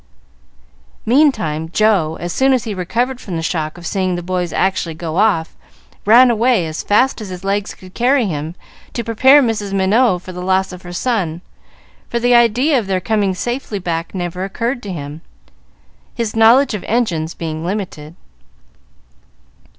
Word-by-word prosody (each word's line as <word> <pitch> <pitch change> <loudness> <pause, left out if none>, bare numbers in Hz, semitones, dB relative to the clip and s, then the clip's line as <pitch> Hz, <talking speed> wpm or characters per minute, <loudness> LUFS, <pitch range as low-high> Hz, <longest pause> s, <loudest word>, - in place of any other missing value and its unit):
Meantime, 215 - +2
Joe, 190 -7 +2
as 175 0 -4
soon 265 0 +3
as 250 -3 +1
he 220 -3 -4
recovered 240 +8 -2
from 185 - -6
the 165 - -3
shock 155 -1 -2
of 175 - -11
seeing 185 -2 -1
the 175 - -5
boys 180 -1 -2
actually 185 -4 -1
go 160 0 -5
off, 195 -6 +1 0.5
ran 240 +3 +7
away, 230 -4 +2
as 155 0 -4
fast 245 +4 +2
as 210 - -7
his 180 0 -8
legs 200 +1 -2
could 185 0 -15
carry 250 +1 +2
him, 160 -2 -4 0.4
to 235 - -3
prepare 260 +6 +5
Mrs. 210 -4 -2
Minot 195 0 +2
for 185 - -8
the 180 0 -7
loss 190 +1 +1
of 180 0 -10
her 175 - -10
son; 175 -5 -2 0.7
for 235 - -1
the 245 +1 +2
idea 240 +5 +4
of 215 - -6
their 190 -1 0
coming 200 -1 0
safely 240 0 -3
back 170 -1 -4
never 180 0 -3
occurred 235 +6 -3
to 205 - -6
him, 150 -2 -7 0.9
his 230 -3 -3
knowledge 230 +4 +5
of 210 - -4
engines 175 -9 -1
being 160 -1 -5
limited. 175 -5 -5
195 Hz, 165 wpm, -17 LUFS, 175-235 Hz, 0.9 s, ran